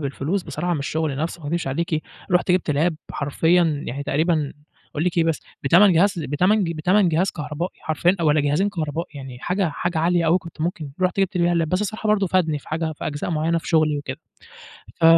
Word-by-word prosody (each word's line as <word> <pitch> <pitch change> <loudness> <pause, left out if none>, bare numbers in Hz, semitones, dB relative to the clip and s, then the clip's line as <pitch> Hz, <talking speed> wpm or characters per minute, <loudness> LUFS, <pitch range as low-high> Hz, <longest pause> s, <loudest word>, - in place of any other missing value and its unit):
بالفلوس 150 +6 -2
بصراحة 175 0 -3
من - - -2
الشغل 150 0 -2
نفْسه 165 +4 -3
ما - - -7
أكدبش 170 -1 -1
عليكِ، 155 +3 -1 0.3
رُحت 180 +1 +2
جِبت 180 -3 +2
lap 155 +4 +2 0.2
حرفيًا 160 +1 +1
يعني 140 +3 -4
تقريبًا 155 0 0 0.4
أقول 150 +3 -2
لِك 175 -1 0
إيه 165 - +4
بس، 165 -2 0 0.2
بتَمَن 180 +7 +6
جهاز 180 +2 +3
بتَمَن 180 +8 +2
ج 170 - -2
بتَمَن 180 +4 +3
جهاز 170 +4 +1
كهربائي 150 +3 -4
حرفيًا 170 +4 +1
والّا 155 -1 +3
جهازين 150 +8 +1
كهربائي، 165 -3 -3
يعني 135 -3 -8
حاجة 180 +5 0
حاجة 170 +2 -2
عالية 170 +1 +2
أوي، 170 +3 +4
كنت 165 -3 -12
ممكن 160 -3 -3
رُحت 185 +1 +1
جبت 190 -1 0
بيها 175 0 +3
الlap، 165 -1 +1
بس 185 +4 0
الصراحة 215 +1 -3
برضو 205 -2 +3
فادني 165 -5 +1
في - - -17
حاجة 160 0 -2
في - - -6
أجزاء 145 +3 -3
معينة 165 +1 +1
في - - -9
شغلي 155 -3 +3
وكده 140 +1 -6 0.8
ف - - -7
165 Hz, 210 wpm, -22 LUFS, 150-180 Hz, 0.8 s, بتَمَن